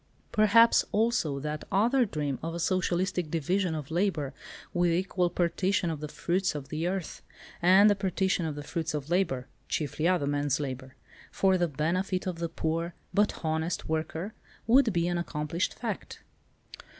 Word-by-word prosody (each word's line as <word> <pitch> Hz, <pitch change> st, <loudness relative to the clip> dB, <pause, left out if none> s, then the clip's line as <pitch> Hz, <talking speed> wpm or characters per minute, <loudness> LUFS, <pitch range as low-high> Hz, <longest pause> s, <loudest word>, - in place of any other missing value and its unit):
Perhaps, 230 Hz, +2 st, +5 dB
also, 205 Hz, -, +1 dB
that 150 Hz, +1 st, -4 dB
other 235 Hz, +6 st, +3 dB
dream 150 Hz, -, -3 dB
of 165 Hz, +1 st, -4 dB
a -, -, -4 dB
socialistic 180 Hz, -1 st, 0 dB
division 170 Hz, +2 st, 0 dB
of 150 Hz, -1 st, -6 dB
labour 165 Hz, -6 st, 0 dB, 0.4 s
with 175 Hz, -1 st, +2 dB
equal 180 Hz, 0 st, +1 dB
partition 175 Hz, +1 st, 0 dB
of 155 Hz, -, -4 dB
the 150 Hz, -, -5 dB
fruits 180 Hz, +3 st, -1 dB
of 135 Hz, -2 st, -6 dB
the 160 Hz, +3 st, -2 dB
earth, 185 Hz, -2 st, -4 dB, 0.4 s
and 190 Hz, +4 st, +7 dB
the 205 Hz, -, +6 dB
partition 190 Hz, -3 st, 0 dB
of 150 Hz, -, -4 dB
the 145 Hz, -, -6 dB
fruits 160 Hz, 0 st, -3 dB
of 150 Hz, +2 st, -5 dB
labour 160 Hz, -9 st, +1 dB, 0.2 s
(chiefly 155 Hz, +2 st, -1 dB
other 180 Hz, -5 st, +2 dB
men's 145 Hz, 0 st, 0 dB
labour) 130 Hz, -2 st, -5 dB, 0.4 s
for 190 Hz, -1 st, +3 dB
the 175 Hz, -1 st, +2 dB
benefit 175 Hz, +6 st, -1 dB
of 180 Hz, -3 st, -3 dB
the 170 Hz, -1 st, -2 dB
poor 165 Hz, +1 st, -2 dB, 0.2 s
but 205 Hz, -4 st, +1 dB
honest 160 Hz, +2 st, -1 dB
worker 160 Hz, +5 st, -3 dB, 0.3 s
would 245 Hz, +1 st, +5 dB
be 170 Hz, -2 st, +1 dB
an 175 Hz, 0 st, 0 dB
accomplished 165 Hz, +1 st, -2 dB
fact. -, -, -5 dB
170 Hz, 160 wpm, -29 LUFS, 155-190 Hz, 0.4 s, and